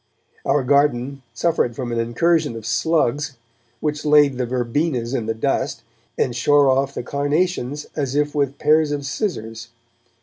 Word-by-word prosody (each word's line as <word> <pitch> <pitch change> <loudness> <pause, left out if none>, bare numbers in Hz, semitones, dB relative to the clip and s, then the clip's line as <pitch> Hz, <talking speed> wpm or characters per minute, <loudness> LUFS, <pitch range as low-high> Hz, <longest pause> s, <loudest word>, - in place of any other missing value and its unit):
Our 145 - +2
garden 140 -1 +1
suffered 125 -3 0
from 125 -2 -4
an 115 - -1
incursion 120 +4 +1
of 115 -2 -8
slugs, 150 -1 0 0.4
which 150 -1 -2
laid 145 -3 +4
the 125 - -1
verbenas 125 +1 -1
in 115 -5 -2
the 115 - -1
dust, 110 - -1 0.3
and 120 - 0
shore 145 +2 +4
off 135 +1 0
the - - -3
carnations 145 0 -1
as 140 -3 -2
if 150 0 +1
with 140 -2 0
pairs 155 0 +3
of 145 -1 -3
scissors. 115 - -4
140 Hz, 155 wpm, -21 LUFS, 120-150 Hz, 0.4 s, laid